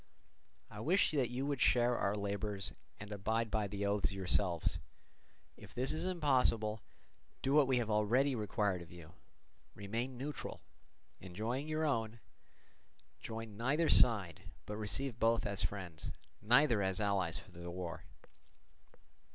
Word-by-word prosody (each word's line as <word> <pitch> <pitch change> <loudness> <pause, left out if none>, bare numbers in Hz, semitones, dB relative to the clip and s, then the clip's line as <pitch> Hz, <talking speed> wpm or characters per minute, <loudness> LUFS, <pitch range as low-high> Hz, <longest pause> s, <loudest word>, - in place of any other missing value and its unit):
I - - -9
could - - -5
wish 185 +6 +3
that 135 -6 +1
you 125 +3 -2
would 140 -2 -1
share 120 0 +4
our 100 -2 0
labours 100 -1 -3 0.3
and 105 0 -8
abide 110 +2 -1
by 105 -2 +1
the 100 +1 -3
oaths 100 0 +1
yourselves; 95 -2 0 0.8
if - - -14
this 125 +2 +1
is 160 - -2
impossible, 125 - +2 0.6
do 135 - +1
what 145 -2 +6
we 130 -1 +3
have 115 -2 0
already 120 +7 +3
required 105 -4 0
of 85 - -11
you—remain 100 +7 -8
neutral, 145 +4 -5 0.6
enjoying 110 - -3
your 155 0 0
own; 115 -5 -1 1.0
join 110 -1 -6
neither 140 +9 +1
side, 100 -9 +4 0.2
but 105 - -5
receive 115 +4 -3
both 115 +1 +3
as 100 -1 -2
friends, 90 -7 -4 0.3
neither 120 0 +4
as 95 -1 0
allies 95 -6 +1
for - - -12
the 85 0 -8
war. 85 -1 -5
110 Hz, 140 wpm, -35 LUFS, 100-125 Hz, 1.0 s, what